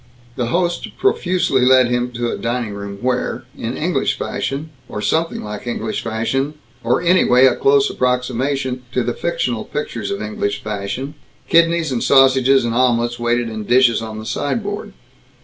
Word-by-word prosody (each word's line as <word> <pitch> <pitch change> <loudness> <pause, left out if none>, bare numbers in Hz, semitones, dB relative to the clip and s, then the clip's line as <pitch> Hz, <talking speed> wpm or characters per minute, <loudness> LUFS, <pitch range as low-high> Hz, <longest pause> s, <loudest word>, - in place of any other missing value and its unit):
The 120 - -1
host 175 +5 -1
profusely 180 - +1
led 130 -1 +5
him 120 0 0
to 120 0 -2
a - - -2
dining 120 -2 -3
room 100 0 -7
where 125 0 -1
in - - -4
English - - 0
fashion, 145 +3 -3 0.2
or 105 - -5
something 160 +11 0
like 105 +3 -7
English 110 -2 -3
fashion, 135 +6 -1 0.3
or 120 +7 +1
anyway 170 -8 +5
a 130 - +4
close 140 0 +3
approximation 125 +1 -1
to 125 - +1
the 120 +1 -1
fictional 120 -9 -2
pictures 115 -8 -4
of 100 - -3
English 105 -1 -3
fashion 110 +7 -4 0.3
kidneys 165 -2 +3
and 120 -2 -1
sausages 135 -1 +5
and 115 - -1
omelets 120 -1 +1
waited 120 0 0
in 110 -1 -5
dishes 120 +1 +4
on 110 -1 -6
the 110 - -7
side 145 - -2
board. 205 0 -5
125 Hz, 165 wpm, -19 LUFS, 115-135 Hz, 0.3 s, led